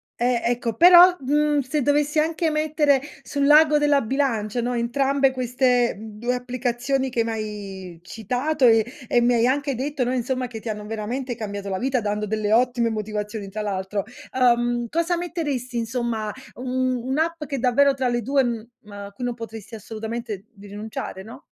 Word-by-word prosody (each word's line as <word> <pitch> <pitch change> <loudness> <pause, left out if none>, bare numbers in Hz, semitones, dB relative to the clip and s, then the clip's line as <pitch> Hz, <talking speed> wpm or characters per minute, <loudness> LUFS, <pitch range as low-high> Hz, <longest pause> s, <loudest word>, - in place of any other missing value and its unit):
eh, 240 0 +1
ecco, 235 -1 -1
però, 355 +5 +8
mhmm, 295 +2 +1
se 280 +3 -1
dovessi 295 +2 +2
anche 320 +1 +1
mettere 305 -2 +2 0.2
sull'ago 295 +2 +4
della 295 -1 +3
bilancia, 240 -3 -1
no, 245 +1 -1
entrambe 270 +3 +1
queste 250 -2 +1
2 220 +3 -3
applicazioni 250 +2 -2
che 235 -3 0
m'hai 205 -5 -6
citato 250 - -1
e 225 -2 +5 0.2
e 245 - +4
mi 240 +1 +3
hai 235 -1 +3
anche 275 +2 0
detto, 270 +1 -2
no, 250 - -1
insomma, 255 0 -1
che 225 -2 -8
ti 230 - -6
hanno 210 -1 -5
veramente 235 +4 -4
cambiato 205 -3 -6
la 190 -1 -2
vita, 260 0 0
dando 210 -1 -2
delle 215 0 -1
ottime 240 0 +2
motivazioni, 210 -1 -4
tra 215 +2 -5
l'altro. 200 0 -2 0.3
Ehm, 240 -1 +2
cosa 335 +6 0
metteresti, 295 -8 -3
insomma, 230 -2 -2 0.2
mhmm, 255 0 -1
un'app 315 +5 -1
che 280 -2 -4
davvero, 270 +3 +4
tra 265 -1 -1
le 240 0 0
2, 275 +5 +2
uhm, 235 -2 -6
a 200 0 -8
cui 225 +5 -6
non 245 - -1
potresti 225 -1 -9
assolutamente 220 -1 -6 0.2
rinunciare, 205 -1 -7
no? 225 +4 -12
245 Hz, 165 wpm, -23 LUFS, 220-275 Hz, 0.3 s, però